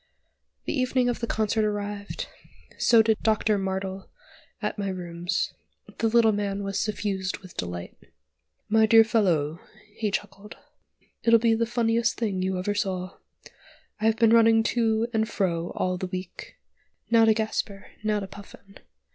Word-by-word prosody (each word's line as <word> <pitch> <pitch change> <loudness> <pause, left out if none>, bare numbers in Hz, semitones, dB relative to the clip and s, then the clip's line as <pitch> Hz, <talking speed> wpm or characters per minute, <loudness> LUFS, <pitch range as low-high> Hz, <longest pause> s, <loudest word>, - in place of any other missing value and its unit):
The - - -2
evening 255 -2 +1
of 240 - -2
the 235 - -3
concert 220 0 0
arrived: 205 -1 -3 0.5
so 230 -2 +5
did 220 -1 +1
Doctor 215 -1 +2
Martel 190 0 -4 0.5
at - - -3
my 200 -1 -1
rooms: 175 -1 -3 0.5
the 225 - +2
little 225 0 +4
man 200 -1 -2
was 195 0 -2
suffused 200 -3 -2
with 185 -3 -15
delight. 90 0 -5 0.7
"My 220 0 +4
dear 225 0 +8
fellow!" 175 -9 +1 0.3
he 215 -1 -2
chuckled, 205 +1 -6 0.6
"it'll 230 0 +6
be 230 0 +3
the 230 +1 0
funniest 235 -1 +1
thing 200 -5 -1
you 190 0 -1
ever 185 +3 -1
saw. 185 -2 -3 0.8
I've 220 +1 +2
been 230 -1 +4
running 225 -1 +5
to 225 -1 +2
and 220 0 +1
fro 175 -5 -1
all 185 -1 -1
the 185 - -3
week. 185 -1 -8 0.5
Now 230 -1 +6
to 220 -1 +4
Gasper, 215 -2 -3
now 210 -1 0
to 195 - -5
Puffin. 200 0 -14
210 Hz, 150 wpm, -26 LUFS, 190-225 Hz, 0.8 s, dear